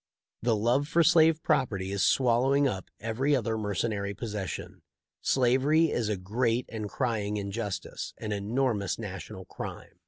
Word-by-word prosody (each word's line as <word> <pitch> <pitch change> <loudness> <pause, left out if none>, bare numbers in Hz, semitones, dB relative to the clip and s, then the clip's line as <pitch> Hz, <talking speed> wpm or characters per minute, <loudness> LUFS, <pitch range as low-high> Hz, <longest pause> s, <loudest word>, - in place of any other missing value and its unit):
The 115 -1 +2
love 120 +7 +2
for 170 +1 +3
slave 165 -2 +5
property 105 -11 0
is 100 -1 -1
swallowing 135 +3 +3
up 95 -7 -4
every 125 +7 +1
other 115 -3 0
mercenary 105 -1 -2
possession. 105 - -5 0.4
Slavery 135 +6 +3
is 115 -3 0
a 105 - 0
great 115 +6 0
and 110 -3 -5
crying 105 -5 -1
injustice 100 -2 -4
— - - -50
an 105 - -5
enormous 105 -1 0
national - - -7
crime." - - -8
115 Hz, 145 wpm, -28 LUFS, 105-135 Hz, 0.4 s, slave